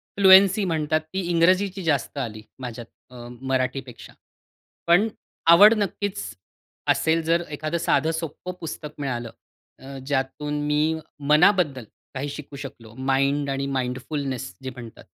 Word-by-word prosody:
Fluency 195 +1 +7
म्हणतात 155 -2 0
ती 190 - -1
इंग्रजीची 185 +3 +2
जास्त 145 -3 -1
आली 110 -5 -4 0.2
माझ्यात 120 -2 -7 0.2
अ, 120 -1 -10
मराठीपेक्षा. 130 -1 -3 0.7
पण 180 +6 +4 0.4
आवड 205 +6 +9
नक्कीच 205 -1 -2 0.7
असेल, 160 +1 +2
जर 165 +2 +1
एखादं 155 +3 -2
साधं 160 -1 +1
सोप्पं 165 +2 -5
पुस्तक 150 -2 -6
मिळालं. 120 -5 -3 0.5
अ, 135 0 -9
ज्यातून 145 +2 -2
मी 150 0 +2 0.5
मनाबद्दल 150 - +4 0.3
काही 135 +2 -3
शिकू 145 0 -8
शकलो 120 -5 -10 0.2
माइंड 140 +1 +1
आणि 135 0 -2
माइंडफुलनेस 130 +1 -3
जे 130 - -4
म्हणतात. 120 -2 -11
145 Hz, 120 wpm, -24 LUFS, 130-170 Hz, 0.7 s, आवड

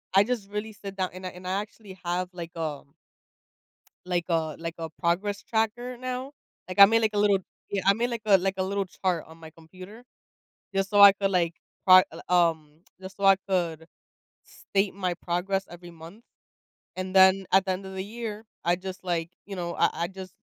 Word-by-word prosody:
I 195 - +7
just 220 -3 -3
really 210 +1 -4
sit 200 -1 -9
down 185 -1 0
and 185 0 -9
I - - -3
and 180 +1 -10
I, 185 - -1
actually, 210 -2 -12
have, 180 +1 -1
like, 170 -2 -7
a 155 -4 -3 1.3
like 175 -1 0
a 160 -3 -1
like 165 0 -5
a 165 -1 -4
progress 185 +5 -1
tracker 235 +3 -2
now. 255 +2 -5 0.4
Like, 185 - -7
I 200 - +12
made, 225 +2 +2
like, 215 -1 +1
a - - +1
little 205 -1 +4 0.3
Yeah, 200 -2 -1
I 195 - +7
made, 240 +3 -1
like 235 -2 -4
a 200 -3 +6
like 190 +1 -1
a 190 - 0
little 200 +1 -1
chart 180 -2 -2
on 160 +1 -15
my 160 -1 -11
computer. 185 +8 -13 0.7
Just 195 0 0
so 205 - +4
I 200 0 +11
could, 195 0 -1
like, 170 -3 +1 0.3
pro 185 0 +9
l - - -9
um, 160 -4 +1 0.2
just 190 0 -10
so 200 - -4
I 195 0 +7
could 170 -4 -1 0.6
state 195 0 -2
my 185 -2 -2
progress 190 +3 -2
every 175 0 -11
month. 170 +7 -13 0.7
And 185 0 -5
then, 190 0 +6
at 190 0 +5
the 190 - 0
end 190 +1 -5
of 190 - -8
the 190 0 -4
year, 220 0 -6 0.2
I 175 +1 +2
just, 190 +1 -8
like, 170 -2 -2 0.2
you 200 -1 -7
know 170 -1 -4
I - - +4 0.2
I - - -3
just 190 -1 -10
190 Hz, 210 wpm, -27 LUFS, 175-200 Hz, 1.3 s, I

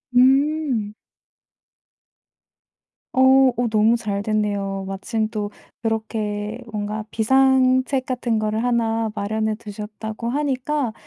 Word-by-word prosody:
음. 265 -4 +3 2.2
어 260 0 +6
어 245 0 +1
너무 220 +2 +3
잘 205 -3 -3
됐네요. 200 -2 -1
마침 215 +3 -2
또 210 -2 -4 0.3
이렇게 220 -1 -2
뭔가 210 0 -3
비상책 260 +2 +3
같은 240 -3 -1
거를 215 +1 -1
1 230 -2 +1
마련해 215 +1 -1
두셨다고 215 +2 -6
하니까 275 -2 -1
225 Hz, 185 characters per minute, -22 LUFS, 210-255 Hz, 2.2 s, 어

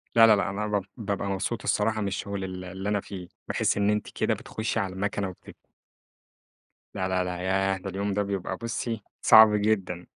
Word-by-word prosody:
لا 115 -1 +8
لا 110 - +7
لأ، 100 0 0
أنا 105 +2 -3
باب 100 -2 -1
بابقى 100 -3 -2
مبسوط 100 +4 -2
الصراحة 110 +1 +1
من 100 - -1
الشُّغل 100 0 -3
ال 95 -1 -6
اللي 95 +2 -5
أنا 105 -1 +1
فيه، 90 -3 -8 0.2
بحيث - - +1
إن 100 0 +2
أنتِ 105 0 0
كده - - 0
بتخُشّي 110 +1 -3
على 95 -3 -2
المَكنة 100 0 -2
وبت 90 - -13 1.4
لا 95 - -1
لا 95 -1 +1
لا 90 -1 -4
ياه! 95 +1 +1
ده 95 - -6
اليوم 100 +1 -2
ده 105 - +1
بيبقى 95 -2 -3
بُصّي، 115 -2 -3 0.2
صعب 110 -1 +8
جدًا، 95 -5 0
100 Hz, 195 wpm, -27 LUFS, 95-105 Hz, 1.4 s, لا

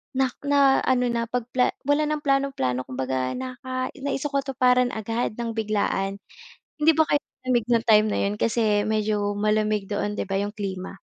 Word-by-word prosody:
na 265 -1 +2 0.2
na 280 -1 +5
ano 250 -2 +2
na 235 0 -1
'pag 245 +1 -2
pla 250 -1 +1
wala 290 +2 +2
nang 300 0 -2
plano-plano, 275 - 0
kumbaga 130 0 -2
naka 255 0 -4
naisakatuparan 270 -3 +1
agad 225 +1 -2
ng 235 0 -3
biglaan. 205 -3 -1 0.6
Hindi 310 +1 +4
ba 315 0 +2
kayo 290 - +2 0.2
nilamig 255 -3 +1
ng 230 -1 +2
time 215 -1 +6
na - - 0
'yon, 200 +1 0
kasi 215 -2 +1
medyo 215 -1 0
malamig 210 -1 0
doon, 205 0 -2
'di 205 - -4
ba 195 - -1
'yong 205 +1 -1
klima. 190 -3 -5
230 Hz, 170 wpm, -24 LUFS, 205-260 Hz, 0.6 s, time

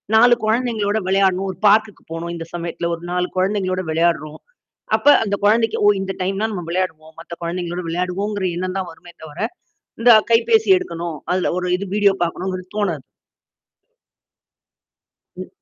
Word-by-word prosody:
4 240 +2 +7
குழந்தைகளோட 220 -2 0
விளையாடனும். 190 0 +2
ஒரு 185 - -13
பார்க்க்கு 215 0 +2
போகணும் 170 +1 -4
இந்த 165 -1 -6
சமயத்தில 170 0 -3
ஒரு 165 - -15
4 180 0 0
குழந்தைகளோடு 185 -1 0
விளையாடுறோம். 155 -2 0 0.6
அப்ப - - -5 0.2
அந்த 200 -1 -1
குழந்தைக்கு, 225 +1 +3
ஓ! - - +6
இந்த 195 0 -3
டைம்ன்னா 195 +4 -1
நம்ம 180 -3 -4
விளையாடுவோம். 160 -3 -3
மத்த 170 +1 -10
குழந்தைகளோடு 175 0 -4
விளையாடுவோம்ங்கிற 185 +3 -2
எண்ணம் 185 +1 -3
தான் 185 -2 -4
வருமே 170 +1 -15
தவிர, 155 +1 -11 0.6
இந்த 240 +1 +7 0.2
கைபேசி 440 - +3
எடுக்கணும். 170 - -5
அதில 185 0 +1
ஒரு 180 - -3
இது 200 - -6
வீடியோ 200 -2 +4
பாக்கனுங்கறது 185 +1 -4
தோணாது. 170 -10 -1 2.3
ம். - - -7
185 Hz, 140 wpm, -20 LUFS, 170-205 Hz, 2.3 s, 4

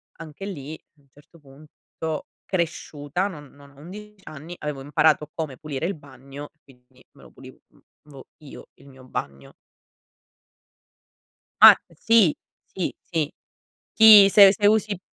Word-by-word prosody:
anche 165 +4 -11
lì 155 -6 -8
a 145 - -36
un 140 - -32
certo 150 +4 -22
punto 150 +2 -10 0.2
cresciuta, 170 -1 -4
non 150 -7 -11
non 140 0 -19
a 140 - -21
11 210 +5 -12
anni 155 +3 -11
avevo 150 -2 -6
imparato 150 +2 0
come 150 -6 -6
pulire 150 -1 -6
il 195 - -2
bagno 140 0 -13
e 155 - -48
quindi 125 -1 -25
me - - -19
lo - - -17
pulivo - - -16 0.9
io, 135 - -13
il 140 - -21
mio 130 -1 -17
bagno. 70 - -8 2.1
Ma - - +11 0.2
sì, 215 -2 +2 0.4
sì, 185 - -4
sì. 160 -4 -4 0.6
Sì, 215 -3 +8
se 200 -1 +7
se 205 +1 -1
usi 210 -2 +1
155 Hz, 140 wpm, -22 LUFS, 140-185 Hz, 2.1 s, Ma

